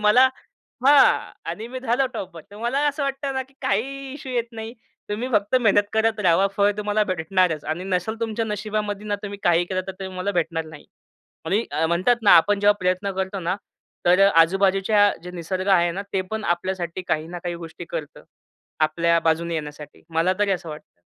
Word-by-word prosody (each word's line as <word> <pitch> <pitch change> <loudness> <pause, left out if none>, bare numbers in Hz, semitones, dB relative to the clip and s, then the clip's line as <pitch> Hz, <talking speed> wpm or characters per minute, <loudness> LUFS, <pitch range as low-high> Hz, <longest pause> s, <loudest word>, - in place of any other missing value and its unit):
मला 215 +5 +6 0.6
हा. 285 0 +5
आणि 225 +2 -5
मी 255 +1 -6
झालो 260 +1 +1
टॉपर 175 -6 -6
तर 205 - -12
मला 240 +5 0
असं 290 +1 -3
वाटतं 275 0 -2
ना, 265 - -1
की 265 +1 -22
काहीही 270 +6 -2
इश्यू 270 -2 -7
येत 235 -1 -1
नाही. 225 +1 -7 0.4
तुम्ही 225 +5 -2
फक्त 210 +1 +1
मेहनत 205 -3 +3
करत 220 0 +1
रहावा 185 0 +4
फळ 205 0 +4
तुम्हाला 210 0 +1
भेटणारच 165 -2 0
आणि 165 +4 -3
नसेल 195 +4 -2
तुमच्या 225 0 -1
नशिबामध्ये 210 -1 -3
ना, 205 - 0
तुम्ही 205 -1 -6
काहीही 175 0 +3
केलं 185 0 -1
तर 190 - -4
ते 190 +1 -8
तुम्हाला 185 +1 -3
भेटणार 165 0 -3
नाही. 155 -2 -12 0.6
आणि 215 +4 +1
अ, 160 - 0
म्हणतात 180 +9 +2
ना, 210 - +5
आपण 200 +5 +3
जेव्हा 205 0 +5
प्रयत्न 185 +2 0
करतो 190 +1 -2
ना, 185 - +1 0.5
तर 180 +2 +5 0.2
आजूबाजूच्या 195 +3 +3
जे 180 - -8
निसर्ग 185 +3 -3
आहे 175 0 +2
ना, 200 - -2
ते 190 - +1
पण 220 -1 -3
आपल्यासाठी 180 0 -4
काही-ना-काही 175 +2 -2
गोष्टी 165 +2 -10
करतं. 155 -3 -7 0.6
आपल्या 170 +2 +2
बाजूने 165 +1 +1
येण्यासाठी, 150 -1 -7
मला 165 +3 +3
तरी 205 -1 +2
असं 175 -2 -4
वाटतं. 150 - -11
195 Hz, 185 wpm, -23 LUFS, 175-220 Hz, 0.6 s, मला